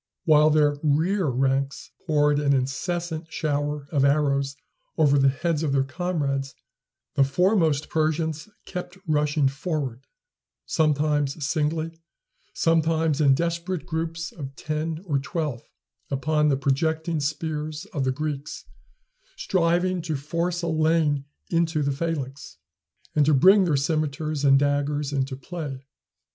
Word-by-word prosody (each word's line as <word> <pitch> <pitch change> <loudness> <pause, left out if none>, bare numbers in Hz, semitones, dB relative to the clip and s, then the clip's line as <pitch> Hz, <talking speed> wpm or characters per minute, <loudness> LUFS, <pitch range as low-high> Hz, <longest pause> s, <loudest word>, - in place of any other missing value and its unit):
While 155 -2 +6
their 150 -1 +3
rear 165 +5 +1
ranks 135 +1 -1 0.2
poured 150 -2 +3
an 140 -1 +2
incessant 160 +5 -2
shower 145 -1 -2
of 140 -4 +2
arrows 140 -1 +2 0.4
over 145 -2 +4
the 135 0 +5
heads 155 +3 -1
of 150 -4 0
their 135 -1 +3
comrades, 140 -3 -2 0.6
the 140 - +4
foremost 160 0 +2
Persians 160 +2 -1 0.2
kept 180 0 -6
rushing 150 -2 +2
forward, 135 -3 -3 0.6
sometimes 150 -1 +1
singly, 160 +2 -1 0.5
sometimes 160 -2 +1
in 140 -2 +5
desperate 170 +2 -2
groups 165 +1 -3
of 135 -4 -8
ten 155 +3 -3
or 145 -6 0
twelve, 140 -3 -3 0.5
upon 150 +2 +1
the 135 - +2
projecting 160 +4 0
spears 155 +2 -3
of 145 -5 -1
the 130 - +1
Greeks, 150 +1 -4 0.7
striving 185 - +1
to 160 -2 -3
force 170 +5 -2
a - - -1
lane 155 -3 +2 0.3
into 165 -2 +1
the 140 - +1
phalanx, 140 -2 -4 0.6
and 150 - +5
to 155 - +5
bring 190 +8 +6
their 155 -5 +2
cimeters 155 0 -1
and 135 -1 +6
daggers 145 +1 0
into 135 -1 -1
play. 140 -3 -6
150 Hz, 130 wpm, -25 LUFS, 140-165 Hz, 0.7 s, While